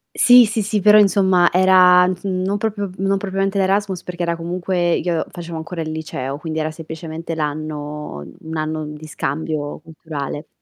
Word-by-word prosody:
Sì, 245 0 +7
sì, 220 0 -1
sì, 210 +1 -1
però 210 +2 +7
insomma 190 -3 +4
era, 180 0 +6
mhmm, 185 - 0
s 180 - -24
non 190 +1 -1
proprio 205 -2 -2
non 195 +1 0
propriamente 195 0 -1
l'Erasmus 195 -1 0
perché 180 -1 -6
era 170 0 0
comunque 175 +1 -1
io 170 -2 -1
facevo 170 -1 -7
ancora 165 +1 -5
il 155 0 -5
liceo 140 -4 -4
quindi 155 +1 -5
era 155 0 -2
semplicemente 160 +1 -7
l' - - -8
anno, 150 - -4
mhmm, - - -14
un 160 - -4
anno 155 0 -2
di 150 +1 -9
scambio 150 0 -3
culturale, 155 -2 -7
170 Hz, 180 wpm, -20 LUFS, 155-190 Hz, -, Sì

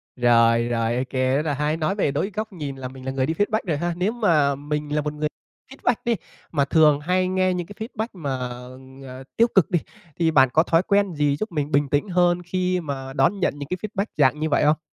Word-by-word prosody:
Rồi, 115 -1 +4
rồi, 115 0 0
OK, 130 +1 -3
rất 130 +2 +1
là 145 - 0
hay, 150 +3 -1
nói 165 +5 -1
về 170 -8 +1
đối 160 +9 -2
góc 215 -1 -4
nhìn 145 -5 -5
là 130 -1 -6
mình 130 0 -11
là 130 - -2
người 135 -1 0
đi 160 - -1
feedback 210 +4 +1
rồi 155 -3 0
ha, 175 +2 -1
nếu 185 +4 +1
mà 160 - +2
mình 150 +1 -3
là 150 - +2
một 150 0 -3
người 150 0 -1 0.4
feedback 245 -3 0
đi, 235 -1 +2 0.4
mà 140 -4 +1
thường 150 -1 +4
hay 185 +4 +1
nghe 185 0 +1
những 175 -2 -4
cái 205 - -11
feedback 220 -2 -4
mà, 155 -7 -5 0.8
ờ, 130 +1 -9
tiêu 230 - +5
cực 195 - +4
đi, 175 - +3 0.4
thì 165 -1 +3
bạn 135 -4 +5
có 160 - +5
thói 170 +1 +2
quen 200 -3 +1
gì 145 -1 +1
giúp 215 +4 -4
mình 150 -2 -2
bình 140 0 +2
tĩnh 145 +9 0
hơn 175 0 +2
khi 180 +1 -1
mà 135 -3 -5
đón 140 +9 +2
nhận 185 - +1
những 145 - -7
cái 180 - -2
feedback 205 -1 -2
dạng 145 +1 +3
như 155 0 -1
vậy 145 - +2
không? 155 +1 +3
155 Hz, 245 wpm, -23 LUFS, 140-185 Hz, 0.8 s, tiêu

